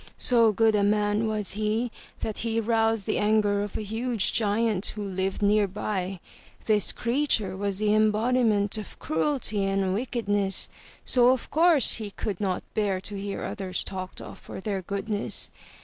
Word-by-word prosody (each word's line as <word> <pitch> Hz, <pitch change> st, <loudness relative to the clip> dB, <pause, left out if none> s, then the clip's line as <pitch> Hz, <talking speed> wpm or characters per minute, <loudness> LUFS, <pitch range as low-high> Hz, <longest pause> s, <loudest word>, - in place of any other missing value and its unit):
So 230 Hz, -3 st, +4 dB
good 220 Hz, +1 st, +3 dB
a 210 Hz, -, +2 dB
man 210 Hz, +1 st, +1 dB
was 215 Hz, -2 st, -1 dB
he 215 Hz, +3 st, -1 dB, 0.3 s
that 220 Hz, -, -3 dB
he 230 Hz, 0 st, -1 dB
roused 225 Hz, -2 st, +1 dB
the -, -, 0 dB
anger 210 Hz, -1 st, +2 dB
of 205 Hz, -1 st, -4 dB
a -, -, -4 dB
huge 225 Hz, +1 st, -1 dB
giant 215 Hz, -2 st, +1 dB
who 210 Hz, -, -4 dB
lived 190 Hz, +1 st, -2 dB
nearby. 200 Hz, -2 st, 0 dB, 0.5 s
This 210 Hz, -3 st, +4 dB
creature 235 Hz, -6 st, +1 dB
was 200 Hz, 0 st, -1 dB
the 210 Hz, 0 st, +2 dB
embodiment 215 Hz, -1 st, +2 dB
of 210 Hz, -, -9 dB
cruelty 210 Hz, -, 0 dB
and 195 Hz, -1 st, 0 dB
wickedness, 205 Hz, -4 st, 0 dB, 0.4 s
so 245 Hz, -1 st, +5 dB
of 255 Hz, -1 st, 0 dB
course 325 Hz, -2 st, +4 dB
he 215 Hz, -2 st, -5 dB
could 200 Hz, -1 st, -5 dB
not 190 Hz, -3 st, -1 dB
bear 200 Hz, -3 st, 0 dB
to 205 Hz, +1 st, -5 dB
hear 200 Hz, 0 st, -4 dB
others 185 Hz, -2 st, -3 dB
talked 185 Hz, -1 st, -6 dB
of -, -, -10 dB
for -, -, -9 dB
their 195 Hz, -1 st, -3 dB
goodness. 200 Hz, +3 st, -2 dB
210 Hz, 160 wpm, -26 LUFS, 200-225 Hz, 0.5 s, so